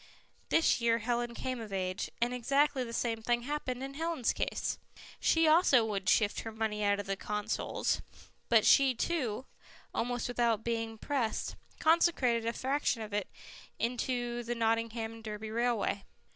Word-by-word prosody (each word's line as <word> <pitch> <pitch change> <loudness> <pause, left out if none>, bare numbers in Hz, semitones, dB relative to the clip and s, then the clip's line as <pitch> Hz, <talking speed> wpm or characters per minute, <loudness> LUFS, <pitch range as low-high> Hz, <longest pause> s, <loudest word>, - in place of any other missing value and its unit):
This 325 -6 +3
year 230 -1 +3
Helen 240 +1 -1
came 255 -1 -3
of 215 -2 -8
age, 185 -1 -2
and 240 +1 +1
exactly 275 +2 +2
the 230 - -6
same 230 -1 -1
thing 240 +1 +1
happened 265 -2 -3
in 270 0 -5
Helen's 320 -4 0
case; - - -2 0.4
she 325 0 +3
also 310 -7 +5
would 195 -4 -1
shift 210 -2 +3
her 225 - -5
money 220 -1 -2
out 205 0 +2
of 195 -1 -3
Consols, 210 +1 -1 0.5
but 225 -2 +5
she, 270 -2 +6
too, 260 -5 -1 0.5
almost 245 0 -1
without 235 -3 +1
being 225 -1 -2
pressed, 245 -2 -2 0.2
consecrated 285 -8 +3
a 230 - 0
fraction 265 -3 0
of 210 -1 -8
it 205 -2 -1 0.7
to 240 -1 -1
the 240 +1 -3
Nottingham 225 0 0
and 225 0 -12
Derby 215 0 -5
Railway. 230 -3 0
235 Hz, 155 wpm, -32 LUFS, 220-255 Hz, 0.7 s, she